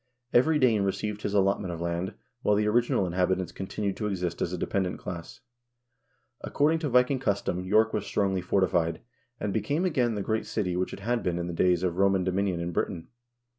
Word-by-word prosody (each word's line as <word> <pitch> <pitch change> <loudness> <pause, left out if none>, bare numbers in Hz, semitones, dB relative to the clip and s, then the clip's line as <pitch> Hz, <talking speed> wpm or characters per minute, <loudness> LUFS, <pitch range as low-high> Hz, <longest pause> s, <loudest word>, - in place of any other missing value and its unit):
Every 150 +6 +4
Dane 120 -7 +3
received 105 +2 -2
his 105 - -2
allotment 100 -1 +2
of 85 - -5
land, 85 +2 -2 0.3
while 105 - +3
the 105 +1 +2
original 115 -3 +2
inhabitants 90 0 0
continued 100 +2 -3
to 105 - -2
exist 90 -4 -3
as 85 - 0
a 90 - -3
dependent 95 +1 -1
class. 85 -2 -8 1.0
According 155 +3 +2
to 155 -3 -2
Viking 125 +2 +3
cus 100 -6 +1
tom 90 - -1
York 110 +5 +2
was - - -2
strongly 95 -2 0
fortified, 85 -3 +1 0.4
and 100 -1 -2
became 150 - 0
again 125 -10 +1
the 100 - -2
great 110 +2 -1
city 90 -5 -1
which 90 +1 -1
it - - -8
had 120 +3 0
been 90 -1 -1
in 85 - -2
the 85 - -4
days 90 +1 +2
of 90 -1 -1
Roman 95 -1 +3
dominion 95 -1 0
in 85 +1 -3
Britain. 85 0 -3
95 Hz, 200 wpm, -28 LUFS, 90-110 Hz, 1.0 s, Every